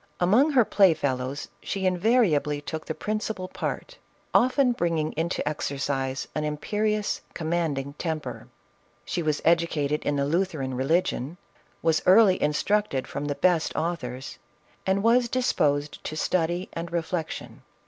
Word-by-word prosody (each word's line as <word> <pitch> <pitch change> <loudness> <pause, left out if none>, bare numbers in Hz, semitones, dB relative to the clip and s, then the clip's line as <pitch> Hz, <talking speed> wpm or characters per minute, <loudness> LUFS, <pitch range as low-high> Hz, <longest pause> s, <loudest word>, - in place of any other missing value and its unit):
Among 215 - +4
her 250 -4 +5
play 190 -6 +5
fellows 135 -1 -2
she 195 -1 -3
invariably 180 - +2
took 155 +2 -6
the 160 - -3
prin 215 0 -2
cipal 190 -4 -5
part, - - -4 0.3
often 255 +1 +4
bringing 165 -7 0
into 165 0 -2
exercise 135 -2 -2
an 155 - -2
imperious, 210 +8 -1
commanding 155 -4 -1
temper. 160 -3 -4 0.6
She 175 - -2
was 155 -2 -1
educated 160 -3 +2
in 145 - 0
the 140 0 +1
Luther 170 0 0
an 130 -1 -3
religion, 140 +2 0 0.5
was 160 -1 +3
early 190 0 +6
instructed 150 0 +1
from 140 - -4
the 145 -1 -2
best 170 +2 +2
authors, 135 -6 -4 0.5
and 195 +1 +2
was 235 +1 +4
disposed 150 - 0
to 155 - -4
study 175 +2 0
and 170 0 -5
reflection. 170 -1 -4
165 Hz, 140 wpm, -26 LUFS, 145-190 Hz, 0.6 s, early